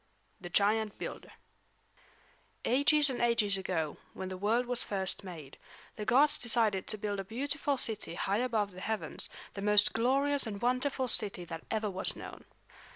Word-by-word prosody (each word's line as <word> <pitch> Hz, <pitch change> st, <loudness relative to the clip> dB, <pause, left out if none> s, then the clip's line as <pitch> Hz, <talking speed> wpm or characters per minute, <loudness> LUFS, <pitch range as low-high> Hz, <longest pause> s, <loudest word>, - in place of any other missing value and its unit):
THE 175 Hz, -, -7 dB
GIANT 210 Hz, +3 st, +2 dB
BUILDER -, -, -7 dB, 1.3 s
Ages 285 Hz, +3 st, +5 dB
and 250 Hz, -, -3 dB
ages 230 Hz, -4 st, +3 dB
ago, 170 Hz, -5 st, -2 dB, 0.2 s
when 190 Hz, -, -5 dB
the 185 Hz, -, -5 dB
world 220 Hz, +6 st, +1 dB
was 245 Hz, 0 st, -1 dB
first 190 Hz, -1 st, -1 dB
made, 165 Hz, -7 st, -10 dB, 0.4 s
the 210 Hz, -, -5 dB
gods 275 Hz, +6 st, +4 dB
decided 220 Hz, -5 st, +2 dB
to 215 Hz, -, -1 dB
build 205 Hz, -1 st, -3 dB
a -, -, -2 dB
beautiful 280 Hz, +6 st, -2 dB
city 215 Hz, -8 st, -2 dB
high 195 Hz, +4 st, 0 dB
above 225 Hz, -5 st, 0 dB
the 185 Hz, 0 st, -10 dB
heavens, 205 Hz, -8 st, -3 dB, 0.2 s
the 200 Hz, -, -6 dB
most 210 Hz, +1 st, +4 dB
glorious 275 Hz, +4 st, +1 dB
and 200 Hz, -2 st, -5 dB
wonderful 255 Hz, +3 st, 0 dB
city 200 Hz, -6 st, -2 dB
that 165 Hz, -1 st, -8 dB
ever 215 Hz, -2 st, -1 dB
was 190 Hz, 0 st, +2 dB
known. -, -, -10 dB
215 Hz, 160 wpm, -32 LUFS, 195-245 Hz, 1.3 s, Ages